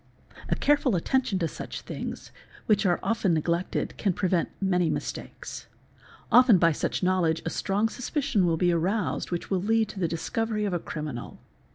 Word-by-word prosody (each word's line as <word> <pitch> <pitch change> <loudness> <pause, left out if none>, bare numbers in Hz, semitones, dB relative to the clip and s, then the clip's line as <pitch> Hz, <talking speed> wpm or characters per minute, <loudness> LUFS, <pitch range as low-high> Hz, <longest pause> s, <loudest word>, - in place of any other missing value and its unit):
A - - +2
careful 285 -6 +2
attention 250 +4 +1
to 170 -3 0
such - - -7
things, - - -6 0.3
which 210 -2 +3
are 175 - +2
often 215 -7 +1
neglected, 170 +3 -1
can 195 -4 +1
prevent 180 -1 0
many 180 -3 +2
mistakes; - - -5 0.6
often 245 -4 +7
by 165 -1 +4
such 155 - -2
knowledge 180 -3 +2
a 165 - -1
strong 205 +3 0
suspicion 250 - 0
will 165 -1 +1
be 175 +1 +3
aroused 185 +6 0
which 175 +2 -4
will 190 -2 +1
lead 220 +2 +2
to 195 - -8
the 175 - +1
discovery 210 +6 -2
of 200 - -1
a 175 - 0
criminal. 150 -7 -6
185 Hz, 170 wpm, -27 LUFS, 170-220 Hz, 0.6 s, often